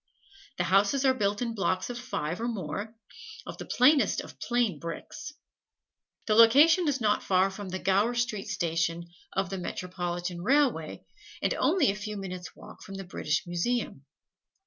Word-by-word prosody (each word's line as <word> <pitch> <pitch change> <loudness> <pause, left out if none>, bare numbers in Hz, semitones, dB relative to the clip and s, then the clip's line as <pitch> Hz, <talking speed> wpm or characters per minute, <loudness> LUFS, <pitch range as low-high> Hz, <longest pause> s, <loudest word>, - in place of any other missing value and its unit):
The - - +1
houses 205 +8 +3
are 260 - +5
built 205 -2 0
in 230 -1 -2
blocks 190 0 -1
of 245 - -6
five 180 -7 -4
(or 235 - -1
more), 210 +1 -4 0.5
of - - -8
the - - -6
plainest 275 +4 +4
of - - -13
plain 240 - 0
bricks. 170 - -7 0.9
The 215 - +2
location 290 - +6
is 275 -2 +1
not 210 -3 +2
far 190 +1 +2
from 195 0 -7
the 185 - -3
Gower 200 +6 +2
Street 225 -5 -1
Station 170 -2 -1 0.3
of 190 -1 -1
the 195 - -3
Metropolitan 175 -1 -4
Railway, 255 - +1 0.4
and - - +2
only 305 - +3
a - - -5
few 210 0 -5
minutes' 185 -2 -7
walk - - -13
from 195 - -9
the 195 - -6
British 160 -3 -2
Museum. 175 - -2
200 Hz, 165 wpm, -28 LUFS, 180-240 Hz, 0.9 s, location